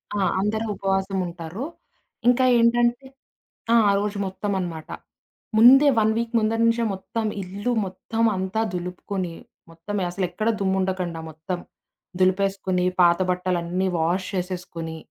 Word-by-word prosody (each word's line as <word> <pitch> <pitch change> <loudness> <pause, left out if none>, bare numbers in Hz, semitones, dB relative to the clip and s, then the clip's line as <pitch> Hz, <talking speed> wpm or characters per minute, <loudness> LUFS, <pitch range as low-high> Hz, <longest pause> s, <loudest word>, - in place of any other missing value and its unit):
ఆ! - - 0 0.2
అందరూ 215 +2 -1
ఉపవాసం 195 0 -1
ఉంటారు. 170 +5 -6 0.6
ఇంకా 250 +1 +5
ఏంటంటే 240 +2 +3 0.7
ఆ! - - +6
ఆ - - +5
రోజు 205 0 -2
మొత్తమనమాట. 185 -5 -4 0.7
ముందే 265 +6 +8
1 220 0 +3
వీక్ 235 0 -2
ముందర 225 +1 0
నుంచే 230 0 +2
మొత్తం 220 +4 -4 0.2
ఇల్లు 200 +6 -3
మొత్తం 225 +4 -3
అంతా 190 +4 -1
దులుపుకొని, 180 0 -4 0.4
మొత్తం 190 +5 -4
అసలెక్కడ 185 +4 -1
దుమ్ముండకండా 190 -3 -1
మొత్తం, 170 +4 -5 0.6
దులిపేసుకొని 185 -1 +1 0.2
పాత 170 0 +5
బట్టలన్నీ 180 0 -1
వాష్ 175 +4 0
చేసేసుకొని, 175 -3 -4
190 Hz, 115 wpm, -24 LUFS, 180-215 Hz, 0.7 s, ముందే